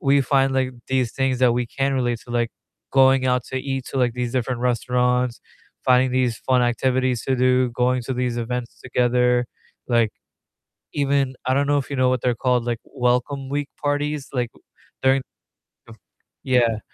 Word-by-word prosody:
we 140 0 +3
find, 135 0 +2
like, 130 -1 +1 0.2
these 130 -3 0
things 135 -2 0
that 125 -2 +5
we 120 0 -1
can 135 +3 -1
relate 120 -3 0
to, - - -13
like 120 -1 0 0.4
going 135 -1 +5
out 125 -1 +2
to 130 - -6
eat 135 -1 -3
to, 135 - -2
like, 125 -2 +2
these 125 -1 -2
different 125 -1 -1
restaurants, 125 0 +1 0.4
finding 125 0 +4
these 125 -3 +1
fun 130 -1 +2
activities 125 0 +1
to 135 - +1
do, 125 0 +3
going 125 +1 +1
to 130 +2 -4
these 125 -1 -1
events 120 0 -4
together, 125 -1 +2 0.4
like, 115 -3 +3 0.8
even 140 -2 +1
I 130 - +2
don't 140 +1 +1
know 145 - +3
if 140 - -3
you 140 - -1
know 130 0 +3
what 125 -2 0
they're 125 -2 +1
called, 125 -2 +2
like, 120 -2 -2
welcome 125 +2 -1
week 145 0 -2
parties, 145 0 -1
like 125 -3 -1 0.5
during, 135 +1 +4 0.7
um - - -12 0.5
yeah, 120 -4 +2
125 Hz, 175 wpm, -22 LUFS, 125-135 Hz, 0.8 s, that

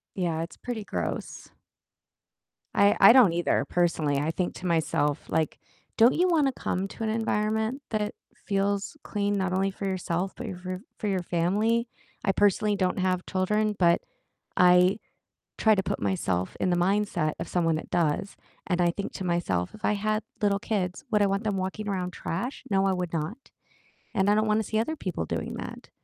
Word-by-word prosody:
Yeah, 170 -4 -1
it's 165 -1 -7
pretty 235 -4 -5
gross. - - -4 1.2
I 200 0 +5
I 200 +3 +10
don't 240 -8 +7
either, 170 +1 +1
personally, 165 -5 +1
I 150 +3 0
think 175 +2 -2
to 185 - -6
myself, 155 -3 0
like, 160 -1 0 0.4
"Don't 235 +3 +6
you 360 +2 +3
wanna 300 -6 +3
come 190 -6 -2
to 225 - -9
an - - 0
environment 220 +3 0
that 210 -1 -1 0.3
feels 200 +3 0
clean? 205 -1 -1
Not 190 -2 0
only 195 +1 +1
for 195 +1 -5
yourself, 185 0 -2
but 245 - -6
your 190 -5 -6 0.2
f - - -11 0.2
for 210 - -2
your 190 -2 0
family?" 210 +8 +1 0.4
I 195 - +3
personally 205 +1 +2
don't 185 -1 0
have 185 -1 0
children, 210 +3 +1
but 170 -2 +4 0.6
I 180 +1 +6 0.6
try 220 -1 +4
to 195 - 0
put - - -3
myself 95 -2 -1
in - - +1
the 175 - +2
mindset 180 -4 +1
of 165 - -4
someone 165 -2 +1
that 155 - -6
does, 170 +2 0 0.3
and 180 -1 +1
I 175 -1 +3
think 200 +3 -5
to - - -5
myself, 170 - -1
"If 215 - -6
I - - +3
had 215 +1 -1 0.2
little 200 -1 +2
kids, 190 -4 -2
would 210 -1 +3
I 200 - +4
want 195 +2 -1
them 210 -3 -1
walking 190 +3 -3
around 185 -3 -2
trash?" 195 +10 -4
No, 195 -1 +2
I 195 - +2
would 180 -2 -3
not, 180 - -4 0.6
and 190 +1 +3
I 205 - +5
don't 215 +1 +2
wanna 215 +1 +2
see 215 +1 -1
other 275 +8 -1
people 185 - -3
doing - - -3
that. - - -8
195 Hz, 190 wpm, -27 LUFS, 175-210 Hz, 1.2 s, I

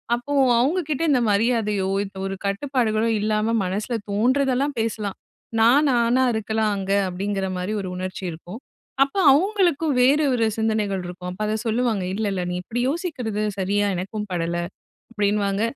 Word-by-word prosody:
அப்போ 265 +4 -5 0.3
அவங்ககிட்ட 300 +1 0
இந்த 255 - +4
மரியாதையோ, 210 -2 +1 0.2
இப்ப 195 -1 -12
ஒரு 195 - -4
கட்டுப்பாடுகளோ 225 0 0
இல்லாம 215 +1 0
மனசில 210 +6 -2 0.2
தோன்றதெல்லாம் 260 +5 +1
பேசலாம். 215 -3 -2 0.4
நான் 255 +7 +5
நானா 240 +1 +3
இருக்கலாம். 220 0 0
அங்க 195 0 -3 0.2
அப்பிடிங்கிறமாரி 190 0 -3
ஒரு 190 - -5
உணர்ச்சி 185 +1 -5
இருக்கும். 175 +7 -9 0.4
அப்ப 275 - -6 0.2
அவுங்களுக்கும் 340 -4 +2
வேறு 285 +5 +4
ஒரு 230 -2 +2
சிந்தனைகள் 215 -4 0
இருக்கும். 180 0 -7
அப்ப 190 +4 -5
அத 215 - 0
சொல்லுவாங்க. 225 -3 0
"இல்ல, 215 +2 -2
இல்ல 185 - -2
நீ - - -2
இப்பிடி 240 +6 -3
யோசிக்கிறது 265 - -3 0.2
சரியா 205 +2 +1
எனக்கும் 210 +4 -4
படல". 170 0 -1 0.5
அப்பிடின்னுவாங்க. 205 -1 0
220 Hz, 140 wpm, -23 LUFS, 195-250 Hz, 0.5 s, நான்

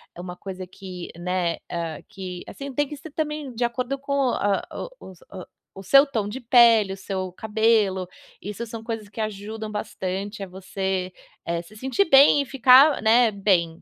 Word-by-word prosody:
É - - -11
uma 180 0 -7
coisa 185 -1 -7
que, 185 -2 -9
né, 180 -1 -1
hã, 165 -3 -4
que 185 -2 -7
assim, 275 -1 -8
tem 290 +2 0
que 295 - -7
ser 295 +2 -11
também 300 -4 -4
de 240 - -1
acordo 255 +3 -2
com 280 0 -2
hã, 200 -1 0 0.4
o - - -11
os 180 - -18
o 185 -2 -8 0.3
o 195 - -9
seu 275 +9 +6
tom 225 -7 -2
de 250 +6 -6
pele, 230 -4 +5
o - - -8
seu 190 -1 -4
cabelo. 210 -3 +1 0.3
Isso 210 +4 -5
são 225 0 -8
coisas 225 -2 -5
que 220 +2 -6
ajudam 215 +1 -5
bastante 200 0 -4
a - - -6
você, 190 0 -3 0.3
eh, 170 0 -2
se 210 +5 -16
sentir 265 - +1
bem 280 +1 +7
e 280 - -3
ficar, 270 +2 +6
né, 225 +1 +5
bem. 180 -5 +1
210 Hz, 185 wpm, -24 LUFS, 185-245 Hz, 0.4 s, bem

